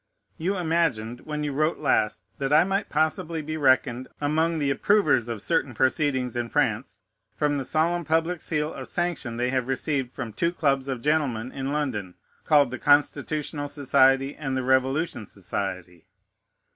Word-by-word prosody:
You 190 +5 -1
imagined, 160 -10 0
when 150 -1 -3
you 145 - -2
wrote 155 +4 0
last, 105 - +1 0.2
that 135 0 -1
I 150 +2 +6
might 195 +2 -1
possibly 160 +1 -1
be 155 +1 -4
reckoned 130 -3 +2
among 160 +3 +1
the 145 -3 0
approvers 140 - +2
of 115 -4 -5
certain 145 -7 0
proceedings 130 -1 +1
in 120 -1 -2
France, - - 0 0.4
from 145 -1 0
the - - -3
solemn 170 +4 +1
public 165 +2 0
seal 150 0 -1
of - - -7
sanction 175 -9 -2
they 125 +1 0
have 130 -2 -1
received 135 -1 -1
from 115 -4 -6
two 170 +8 0
clubs 140 -5 +1
of 130 -3 -4
gentlemen 135 -6 0
in 135 0 -4
London, 120 -12 -3 0.3
called 145 -4 +4
the 130 - -5
Constitutional 145 0 +1
Society, 135 -1 +3
and 135 -3 -3
the 130 - -1
Revolution 130 - +1
Society. 95 -3 -5
140 Hz, 160 wpm, -25 LUFS, 125-155 Hz, 0.4 s, I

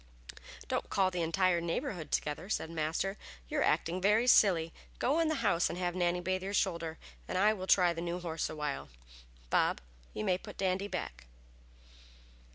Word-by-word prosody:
"Don't - - -2
call 190 -1 +2
the 180 -1 -2
entire 175 +1 +2
neighborhood 170 - -3
together," 155 +5 -2
said 165 -6 -2
Master, 165 +5 -2 0.3
"you - - -1
are - - +3
acting 175 +3 +1
very 210 +5 +4
silly! 175 -9 +5 0.2
Go 285 +6 +1
in 330 - +3
the 315 - +1
house 170 0 +3
and 170 - -4
have 175 -1 -1
Nannie 175 -1 +1
bathe 185 +1 -1
your 195 +2 -3
shoulder, 170 -4 -1 0.3
and - - -2
I 210 +3 +4
will 190 -3 -6
try 180 -3 +5
the 165 - -5
new 175 +1 -3
horse 165 -2 -3
awhile. 150 -2 -4 0.6
Bob, - - +2 0.4
you - - -2
may 185 -2 +2
put - - -11
Dandy 190 +1 0
back." - - -6
180 Hz, 175 wpm, -32 LUFS, 165-195 Hz, 0.6 s, silly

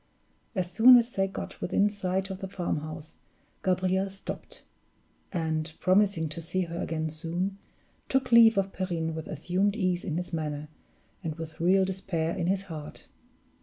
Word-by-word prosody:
As 180 -2 -1
soon 245 +7 +9
as 240 0 +1
they 195 -3 +1
got 195 - -7
within 200 +3 +2
sight 190 -1 -2
of 190 - -6
the 195 - -4
farmhouse, 155 -4 -4 0.5
Gabriel 185 +1 +1
stopped; 195 +1 -7 0.7
and, 160 -2 -1
promising 185 -3 +3
to 155 +2 -5
see 185 +3 0
her 170 -1 -3
again 160 -1 -2
soon, 175 +5 -3 0.5
took 265 -2 +1
leave 230 -2 +8
of 195 0 0
Perrine 170 -4 -2
with 160 0 -6
assumed 185 +7 0
ease 185 -4 0
in 165 -4 -2
his 180 0 -4
manner 150 -2 -3 0.5
and 160 -3 -3
with 160 -1 -8
real 190 +3 +4
despair 180 -4 -2
in 175 -3 -1
his 195 +1 +1
heart. 160 -6 -8
185 Hz, 160 wpm, -28 LUFS, 160-195 Hz, 0.7 s, soon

